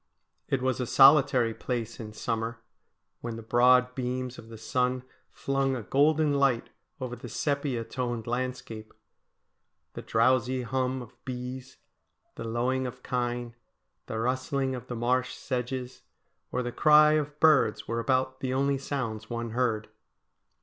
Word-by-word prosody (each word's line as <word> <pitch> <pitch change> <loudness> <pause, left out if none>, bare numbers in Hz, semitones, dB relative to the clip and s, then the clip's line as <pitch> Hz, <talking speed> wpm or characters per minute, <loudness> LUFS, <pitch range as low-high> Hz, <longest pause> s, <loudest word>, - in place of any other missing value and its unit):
It 130 -2 0
was 130 -1 0
a 125 - -2
solitary 135 -4 +6
place 120 -1 -4
in 110 -2 -7
summer, 115 +2 -3 0.6
when 120 -1 -5
the 115 - -8
broad 125 +2 +4
beams 125 0 -3
of 115 - -12
the 115 - -9
sun 125 +2 0 0.3
flung 135 -1 -1
a 120 - -5
golden 150 +6 +3
light 135 -4 +1 0.3
over 125 -2 -4
the 125 0 -9
sepia 140 -3 -1
toned 120 -2 -3
landscape. 120 -3 -4 1.0
The - - -6
drowsy 125 +2 +2
hum 130 +1 -1
of 120 +1 -18
bees, 130 0 -6 0.6
the - - -7
lowing 125 +3 0
of 125 0 -9
kine, 120 -1 -2 0.5
the 110 - -4
rustling 130 +3 -1
of 125 -1 -7
the 125 - -5
marsh 125 +2 0
sedges, 125 0 -4 0.5
or 125 - -1
the 120 - -3
cry 150 +3 +6
of 150 -1 -1
birds 150 -9 +4
were 115 +1 -1
about 130 +2 0
the 130 -1 -2
only 140 0 +1
sounds 115 -6 -4
one 115 -1 -4
heard. 115 -3 0
125 Hz, 145 wpm, -28 LUFS, 120-130 Hz, 1.0 s, solitary